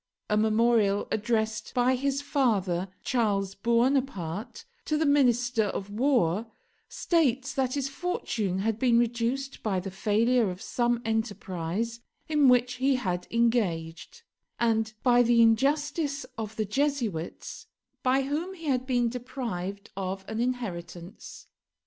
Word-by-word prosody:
A -, -, +4 dB
memorial 215 Hz, -1 st, +2 dB
addressed 220 Hz, 0 st, -1 dB
by 250 Hz, +1 st, +3 dB
his 275 Hz, +2 st, -1 dB
father, 200 Hz, -, +1 dB, 0.2 s
Charles 200 Hz, -5 st, 0 dB
Buonaparte, 235 Hz, -, -1 dB, 0.2 s
to 305 Hz, -, 0 dB
the 315 Hz, -, +1 dB
Minister 245 Hz, -5 st, +3 dB
of 200 Hz, 0 st, -4 dB
War 225 Hz, -, +1 dB, 0.4 s
states 270 Hz, -6 st, +1 dB
that 260 Hz, -1 st, 0 dB
his 275 Hz, -2 st, -1 dB
fortune 240 Hz, -, -2 dB
had 215 Hz, +2 st, -1 dB
been 240 Hz, -2 st, +4 dB
reduced 240 Hz, +3 st, -1 dB
by 195 Hz, -4 st, 0 dB
the 190 Hz, +1 st, -6 dB
failure 220 Hz, +3 st, +2 dB
of 180 Hz, 0 st, -6 dB
some 240 Hz, +2 st, -1 dB
enterprise 220 Hz, -1 st, -2 dB, 0.3 s
in 300 Hz, -3 st, +3 dB
which 250 Hz, 0 st, +3 dB
he 265 Hz, +1 st, +2 dB
had 180 Hz, -8 st, -2 dB
engaged, 225 Hz, -, -1 dB, 0.4 s
and 225 Hz, -2 st, +1 dB
by 245 Hz, -1 st, +5 dB
the 240 Hz, 0 st, +4 dB
injustice 280 Hz, +5 st, +2 dB
of 220 Hz, -2 st, -5 dB
the 215 Hz, -, -1 dB
Jesuits, 230 Hz, -, -2 dB, 0.3 s
by 260 Hz, +1 st, +2 dB
whom 315 Hz, +8 st, -3 dB
he 330 Hz, -3 st, -11 dB
had 260 Hz, -3 st, 0 dB
been 245 Hz, -2 st, +2 dB
deprived 225 Hz, -5 st, -5 dB
of 190 Hz, 0 st, -4 dB
an 220 Hz, 0 st, -4 dB
inheritance. 190 Hz, -8 st, -5 dB
235 Hz, 130 wpm, -28 LUFS, 205-260 Hz, 0.4 s, by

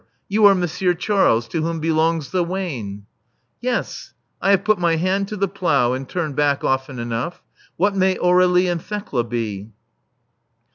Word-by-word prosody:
You 205 Hz, +1 st, +5 dB
are 200 Hz, -, +6 dB
Monsieur 180 Hz, 0 st, 0 dB
Charles, 170 Hz, -, +2 dB
to 165 Hz, -, -2 dB
whom 165 Hz, +1 st, -2 dB
belongs 160 Hz, -2 st, 0 dB
the 180 Hz, -1 st, +1 dB
wain." 135 Hz, -, -5 dB, 0.6 s
Yes, 250 Hz, 0 st, -3 dB, 0.3 s
I 195 Hz, -, +1 dB
have 195 Hz, -1 st, +4 dB
put 215 Hz, -1 st, +2 dB
my 170 Hz, -2 st, +2 dB
hand 190 Hz, +4 st, 0 dB
to 210 Hz, -, -6 dB
the 200 Hz, 0 st, +1 dB
plough 145 Hz, -10 st, +1 dB
and 130 Hz, 0 st, -5 dB
turned 160 Hz, -6 st, -3 dB
back 145 Hz, -1 st, +1 dB
often 130 Hz, 0 st, -1 dB
enough. 120 Hz, +8 st, -4 dB, 0.3 s
What 200 Hz, +2 st, +1 dB
may 190 Hz, -1 st, +2 dB
Aur61ie 180 Hz, 0 st, +3 dB
and 170 Hz, -2 st, -2 dB
Thekla 200 Hz, -, -3 dB
be?'' 110 Hz, -3 st, -4 dB
170 Hz, 160 wpm, -21 LUFS, 135-190 Hz, 0.6 s, are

